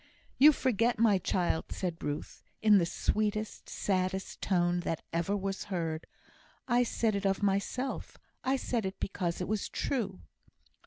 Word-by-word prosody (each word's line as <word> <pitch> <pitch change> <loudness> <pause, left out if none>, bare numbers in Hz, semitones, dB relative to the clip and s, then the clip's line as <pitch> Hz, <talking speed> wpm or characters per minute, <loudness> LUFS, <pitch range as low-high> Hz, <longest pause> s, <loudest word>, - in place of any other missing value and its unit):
"You 295 +3 +10
forget, 240 -4 +1
my 215 -4 +4
child," 175 -2 0
said 175 -3 -4
Ruth, 145 +1 -4 0.2
in 210 -2 +6
the 170 - +1
sweetest, 215 +3 -1
saddest 190 0 -1
tone 175 -2 +2
that 165 -2 -3
ever 170 +5 +1
was 195 0 -3
heard, 165 -5 -3 0.6
"I 245 -1 +4
said 230 -2 +1
it 200 0 0
of 195 +1 0
myself; 205 +7 -1 0.3
I 265 +1 +2
said 245 -3 -1
it 190 - -7
because 180 -3 -2
it 180 - -2
was 210 0 -1
true." 225 - -2
195 Hz, 150 wpm, -31 LUFS, 180-220 Hz, 0.6 s, You